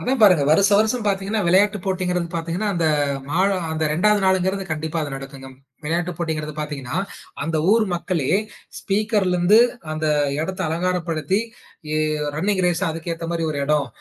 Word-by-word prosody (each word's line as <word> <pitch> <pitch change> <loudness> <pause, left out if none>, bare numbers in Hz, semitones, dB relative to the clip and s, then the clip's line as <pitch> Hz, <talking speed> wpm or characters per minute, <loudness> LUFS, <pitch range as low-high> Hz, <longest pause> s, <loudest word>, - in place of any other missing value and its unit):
அதா 255 - -1
பாருங்க. 180 -8 +6
வருஷ, 195 +6 +5
வருஷம் 220 +1 +1
பாத்தீங்கன்னா 200 +2 0
விளையாட்டுப் 200 +2 +3
போட்டிங்கிறது 180 -2 -1
பாத்தீங்கன்னா, 170 +5 -2
அந்த 170 - 0 0.5
மா 170 - 0 0.3
அந்த 160 0 -1
ரெண்டாவது 210 +5 +3
நாள்ங்கிறது 190 +1 +1
கண்டிப்பா 155 +1 -2
அது 145 - -4
நடக்குங்கம். 135 -1 -10 0.3
விளையாட்டுப் 170 +2 -2
போட்டிங்கிறது 155 -3 -3
பாத்தீங்கன்னா, 140 -3 -5 0.5
அந்த 160 -1 -1 0.2
ஊர் 225 -1 +4
மக்களே 170 -5 -1 0.5
ஸ்பீக்கர்லருந்து 200 -2 +2 0.3
அந்த 155 0 -2 0.3
இடத்த 185 +4 -4
அலங்காரப்படுத்தி, 175 +2 -1 0.5
ஏ - - +1 0.4
ரன்னிங் 190 +3 0
ரேஸ் 175 +1 0
அதுக்கு 165 +1 -4
ஏத்த 165 0 -6
மாரி 165 -1 -2
ஒரு 145 - -3
இடம், 150 0 +1
175 Hz, 145 wpm, -22 LUFS, 155-195 Hz, 0.5 s, பாருங்க